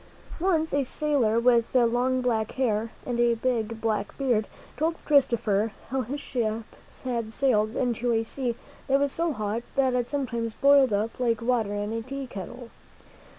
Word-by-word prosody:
Once 325 -3 +1
a 285 0 +2
sailor 260 -5 +1
with 235 0 +3
long 250 +1 +3
black 225 -3 0
hair 230 -4 0 0.2
and 240 -1 -2
a 240 -1 +4
big 230 -2 -1
black 215 -3 -2
beard 240 -6 +1 0.3
told 325 +2 0
Christopher 230 -7 +2 0.2
how 265 +1 0
his 270 +5 -4
ship 230 -5 -2 0.4
had 235 -4 -2
sailed 220 -3 +1
into 245 -1 0
a 225 -1 +2
sea 240 +1 -3 0.3
that 275 +1 +3
was 285 -1 +1
so 335 +2 0
hot 215 -2 -2
that 265 -2 +3
it 245 -1 0
sometimes 235 -5 -2
boiled 280 -2 +5
up 210 +4 -1
like 230 -3 +1
water 230 -4 0
in 205 +1 -2
a 230 - -2
tea 275 +3 -5
kettle. 235 +2 -8
240 Hz, 165 wpm, -26 LUFS, 225-265 Hz, 0.4 s, boiled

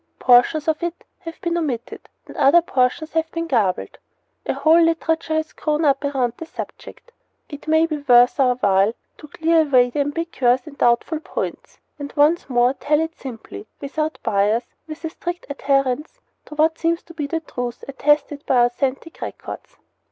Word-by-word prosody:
Portions 255 +5 +4
of 315 -1 0
it 345 0 -4 0.2
have 330 -2 -9
been 340 0 -1
omitted, 250 -8 -5 0.2
and - - -12
other 330 +5 +5
portions 275 +2 0
of - - -4
it 320 - +2
have 325 - -38
been 335 0 -2
garbled. 220 - -1 0.5
A - - +1
whole 325 +2 +5
literature 325 -1 +1
has 315 0 -2
grown 305 +1 -1
up 275 0 +2
around 265 -4 0
the 330 - -8
subject. 485 - -9 0.4
It 290 0 -10
may 315 0 +4
well 320 -2 0
be 285 - -17
worth 245 +2 +5
our 250 -2 +4
while 200 -2 +2 0.3
to 300 - -11
clear 325 +2 +2
away 255 -5 +3
the 290 - -3
ambiguities 280 -4 0
and 305 -3 -11
the - - -33
doubtful 240 +6 +2
points, - - -6 0.2
and 285 0 -6
once 300 +2 +3
more 245 0 +3
to - - -33
tell 300 0 +2
it 320 +1 -2
simply, 225 -4 -9
without 305 +2 -3
bias, 210 +4 +1 0.2
and 310 - -6
with 330 - -10
a - - -2
strict 350 0 -6
adherence 275 - -1 0.3
to 300 - -11
what 320 +2 +2
seems 335 +1 0
to 335 - -14
be 300 -3 -4
the 325 +3 -2
truth 245 -5 -6
attested 295 +1 +1
by 245 -2 +4
authentic 270 +6 -3
records. - - -8
295 Hz, 190 wpm, -21 LUFS, 250-325 Hz, 0.5 s, other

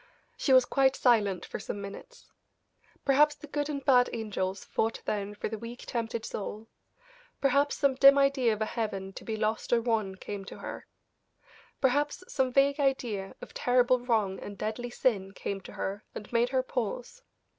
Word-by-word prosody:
She 275 - 0
was 255 -1 +7
quite 270 +1 +3
silent 205 -7 +2
for - - -6
some 205 - -5
minutes. 475 - -10 0.7
Perhaps 295 +2 +5
the 300 - -11
good 290 0 -2
and 280 -2 -4
bad 250 -3 +5
angels 195 -4 -3
fought 225 +1 -1
then 205 0 -2
for - - -3
the 220 0 -5
weak, 235 +2 -8
tempted 230 -1 -3
soul; 215 +2 -5 0.7
perhaps 280 +1 +2
some 280 -2 +3
dim 275 +1 +7
idea 275 -4 +3
of 215 0 -1
a - - 0
heaven 195 -4 -3
to - - -9
be 220 -1 -3
lost 215 +1 -1
or 240 - +5
won 225 -5 0
came 200 +1 -6
to - - -9
her; - - -7 0.9
perhaps 290 +5 +1
some 265 -2 0
vague 280 +3 +3
idea 240 -8 -1
of - - -10
terrible 250 0 +3
wrong 220 -6 0
and 200 -1 -8
deadly 220 +4 -3
sin 200 -6 0
came 195 0 -4
to - - -11
her 200 +2 -4
and 210 - -8
made 235 +1 +3
her 260 0 +1
pause. 250 - -4
240 Hz, 175 wpm, -29 LUFS, 210-270 Hz, 0.9 s, was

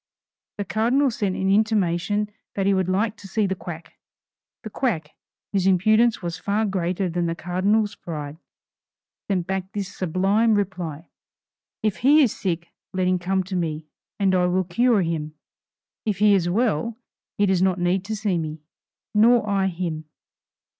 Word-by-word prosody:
The 205 - -3
Cardinal 245 +7 +2
sent 200 -4 -1
an 190 0 0
intimation 205 -1 +1 0.2
that 195 - 0
he 200 - +4
would 190 -1 +1
like 210 +4 +1
to 200 - -11
see 210 +2 0
the 190 - 0
quack. 175 -3 -9 0.6
The 220 - -7
quack, 170 - -1 0.4
whose 190 -1 +2
impudence 215 +4 +3
was 170 -1 -4
far 205 +5 0
greater 185 -1 -1
than 175 0 -1
the 165 - -2
Cardinal's 200 +5 +1
pride, 150 -4 -7 0.9
sent 185 -3 0
back 190 0 -3
this 200 -2 -4
sublime 195 +6 +2
reply: 175 -5 -3 0.8
"If 215 -3 0
he 290 +5 +5
is 240 - +1
sick 170 -3 -3 0.2
let 185 -1 0
him 185 0 +2
come 190 +2 0
to 190 +1 -5
me, 160 -3 -2 0.3
and 195 -2 +2
I 180 -1 +3
will 185 +1 +1
cure 220 +3 +2
him. 155 -2 -3 0.7
If 210 -4 -1
he 210 0 +5
is 175 -3 +2
well, 220 +1 0 0.4
he 205 - +3
does 190 -2 +2
not 190 -1 +2
need 180 +2 +1
to 220 +1 -3
see 205 -5 0
me, 155 -1 -5 0.5
nor 225 +1 +5
I 195 -1 +1
him." 170 -3 -3
190 Hz, 165 wpm, -23 LUFS, 175-210 Hz, 0.9 s, he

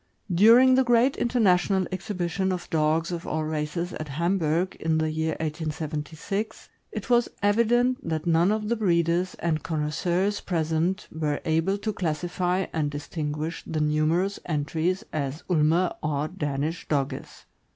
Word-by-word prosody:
During 230 +8 +7
the 260 +1 +5
great 245 +2 +3
international 195 -5 +2
exhibition 185 -1 -2
of 180 -1 -4
dogs 160 +2 +1
of 170 -1 -5
all 155 0 -1
races 155 +3 -3
at 155 - -5
Ham 170 +7 0
burg, 165 +3 0
in 160 0 +1
the 155 0 0
year 160 0 -1
1876, 155 +5 -4 0.2
it - - -5
was 240 0 +4
evident 235 +4 +3
that 160 -1 -2
none 170 +3 +3
of 215 0 -1
the 235 - +1
breeders 175 -3 +1
and 160 -2 -1
connois 150 -2 -2
seurs 185 +6 0
present 165 +2 -1
were 150 -2 -1
able 165 +5 +1
to 215 +1 -3
classify 180 +2 -1
and 155 -2 0
distinguish 150 +2 -4
the 160 - -2
numerous 155 +6 +1
entries 160 +4 -1
as 145 +1 -3
Ulmer 165 +2 +3
or 150 0 -1
Danish 150 -2 -3
Dogges. 140 -2 -3
170 Hz, 145 wpm, -26 LUFS, 155-190 Hz, 0.2 s, During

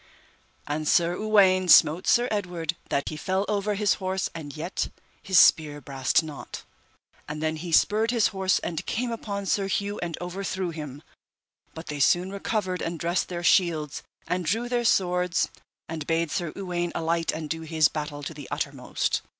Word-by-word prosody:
And 150 +1 -3
Sir 170 +2 +3
Uwaine 190 -3 +4
smote 160 +2 +6
Sir 240 +1 +4
Edward 175 -5 -2
that 140 - 0
he - - -6
fell 190 +5 -1
over 205 0 0
his 205 -1 +2
horse 190 0 -1
and 155 -2 -8
yet 170 +5 -2 0.3
his 190 -1 +1
spear 150 -3 +5
brast 135 +2 +1
not. 150 -3 -8 0.7
And 150 0 -4
then 155 0 -1
he 170 +2 -6
spurred 215 +7 +3
his 235 -3 +3
horse 190 -1 +1
and 165 -2 -3
came 240 +1 -1
upon 200 -3 -4
Sir 195 0 +1
Hue 200 +1 -2
and 170 -2 -4
overthrew 185 0 -3
him, 150 -3 -8 0.7
but 160 +1 -8
they 150 -1 -5
soon 175 +6 +3
recovered 200 -2 -2
and 165 0 -3
dressed 170 +2 -1
their 175 -1 -4
shields 165 -5 +2 0.3
and 180 0 -1
drew 225 +9 0
their 240 -1 0
swords 180 -4 +2 0.4
and 160 -2 -5
bade 165 -1 0
Sir 170 -3 -2
Uwaine 175 -3 -2
alight 165 0 0
and 155 -1 -5
do 165 +2 -3
his 160 -2 +3
battle 150 -1 -5
to 160 - -5
the 145 -3 -9
uttermost. - - -2
175 Hz, 175 wpm, -26 LUFS, 155-195 Hz, 0.7 s, smote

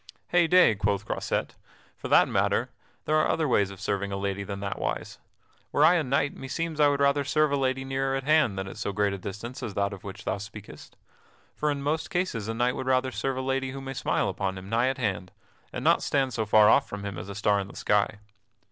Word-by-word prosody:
"Heyday!" 175 -5 +5
quoth 100 0 -1
Croisette, - - -2 0.4
"for - - -7
that - - +5
matter, - - 0 0.3
there 155 - +2
are 155 - +3
other 160 -2 +1
ways 100 -6 +2
of 100 -1 -11
serving 100 0 -2
a 100 - -2
lady 100 0 -2
than 100 0 -6
that 100 0 -4
wise. - - -4 0.5
Were 145 - +4
I 165 - +7
a 170 -3 +2
knight 140 +1 0
meseems 155 +4 -4
I 150 - +6
would 140 -1 +1
rather 140 0 +3
serve 155 +2 +2
a - - +2
lady 135 -1 -1
nearer 135 0 -1
at 135 - -2
hand 150 -9 +3
than 95 0 -3
at - - -9
so 100 - -3
great 100 -1 0
distance 105 +7 -7
as 100 - -5
that 100 0 0
of 95 - -10
which 100 +2 -9
thou 100 - -1
speakest. 105 0 -11 0.6
For 150 - 0
in 140 -1 -2
most 155 +3 -1
cases 175 - -2
a 115 - -3
knight 125 +2 +1
would 130 - -5
rather 130 0 +2
serve 135 0 -2
a - - -1
lady 135 0 -1
who 135 - -6
may 135 0 -6
smile - - 0
upon 95 -1 -2
him 95 +1 -9
nigh 115 +3 +2
at 135 +1 -1
hand, 95 -6 -2 0.4
and - - -5
not - - +4
stand 135 -3 0
so 110 -2 -2
far 105 0 +6
off - - +4
from 105 0 -6
him 100 -3 -5
as - - -8
a 100 - -6
star 100 0 +2
in 100 - -4
the - - -13
sky." 105 0 +1
120 Hz, 240 wpm, -27 LUFS, 100-140 Hz, 0.6 s, I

